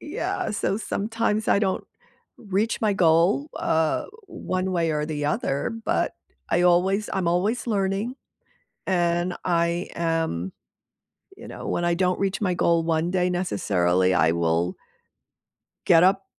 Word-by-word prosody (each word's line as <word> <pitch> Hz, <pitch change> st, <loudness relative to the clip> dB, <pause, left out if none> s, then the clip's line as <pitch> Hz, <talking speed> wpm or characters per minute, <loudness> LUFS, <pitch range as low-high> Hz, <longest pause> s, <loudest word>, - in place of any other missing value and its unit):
Yeah, 325 Hz, +10 st, -3 dB
so 200 Hz, -1 st, -1 dB
sometimes 220 Hz, 0 st, -2 dB
I -, -, +4 dB
don't 195 Hz, -2 st, -1 dB, 0.5 s
reach 210 Hz, +2 st, -1 dB
my 215 Hz, -2 st, +2 dB
goal, 180 Hz, -, +3 dB
uh, 160 Hz, -1 st, +1 dB, 0.2 s
one 190 Hz, -, -3 dB
way 170 Hz, -2 st, +1 dB
or 150 Hz, -1 st, -1 dB
the 150 Hz, -2 st, -3 dB
other, 140 Hz, -2 st, -1 dB
but -, -, 0 dB, 0.4 s
I 175 Hz, -, +2 dB
always 185 Hz, +4 st, +2 dB
I'm 190 Hz, -3 st, -1 dB
always 200 Hz, +9 st, 0 dB
learning, 200 Hz, +2 st, -1 dB, 0.7 s
and 175 Hz, -1 st, 0 dB
I 170 Hz, 0 st, 0 dB
am 165 Hz, -, -1 dB, 0.9 s
you -, -, -11 dB
know, -, -, -8 dB
when 175 Hz, -, -1 dB
I 175 Hz, -, +2 dB
don't 180 Hz, 0 st, 0 dB
reach 195 Hz, 0 st, -1 dB
my 185 Hz, -3 st, +1 dB
goal 170 Hz, -1 st, +2 dB
one 165 Hz, +1 st, 0 dB
day 180 Hz, -1 st, +1 dB
necessarily, 95 Hz, -, +1 dB
I 80 Hz, -3 st, +3 dB
will 85 Hz, +1 st, 0 dB, 1.1 s
get 165 Hz, -1 st, +6 dB
up 195 Hz, +1 st, +3 dB
180 Hz, 140 wpm, -24 LUFS, 160-195 Hz, 1.1 s, get